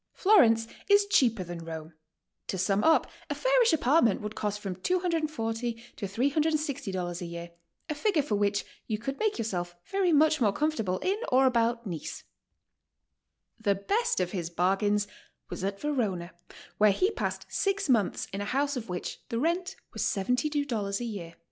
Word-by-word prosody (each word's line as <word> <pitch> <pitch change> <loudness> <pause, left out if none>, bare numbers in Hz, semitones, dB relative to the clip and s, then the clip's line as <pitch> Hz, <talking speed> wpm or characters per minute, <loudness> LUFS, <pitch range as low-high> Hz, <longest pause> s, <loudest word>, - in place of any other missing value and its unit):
Florence 235 - +5 0.2
is 405 0 +6
cheaper 245 - +3
than 175 -1 -7
Rome. 160 0 -7 0.5
"To 190 - -2
sum 195 +3 +1
up, 320 - +5 0.2
a - - -1
fairish - - +4
apartment 285 - +3
would 210 0 -5
cost 210 -1 -2
from 195 -3 -4
$240 345 - 0 0.7
to 205 - -3
$360 255 - -1
a - - -3
year, 170 0 -7 0.4
a - - -1
figure 320 -1 +1
for 250 - -3
which 200 0 +1 0.2
you 215 - -1
could 270 +6 -5
make 435 -1 +1
yourself 175 -6 -3 0.2
very 385 -2 +2
much 310 -1 +4
more 210 -3 +4
comfortable 220 -8 0
in 395 +3 +1
or 260 +1 +5
about 235 -1 +2
Nice." 165 -6 -5 1.4
The 205 -3 +2
best 405 - 0
of 180 -1 0
his 175 -4 -3
bargains 195 +4 +1 0.4
was - - -5
at 195 0 -2
Verona, 210 -12 -1 0.5
where 210 0 +7
he 370 - +2
passed - - -3
six 395 -1 0
months 230 -7 +1
in 200 - -3
a - - -2
house 280 +6 0
of 230 -5 -5
which 180 -1 -4
the 230 - -2
rent 340 +7 0 0.2
was - - -4
$72 245 -2 0
a - - -4
year. 180 -7 -6
230 Hz, 165 wpm, -29 LUFS, 195-305 Hz, 1.4 s, where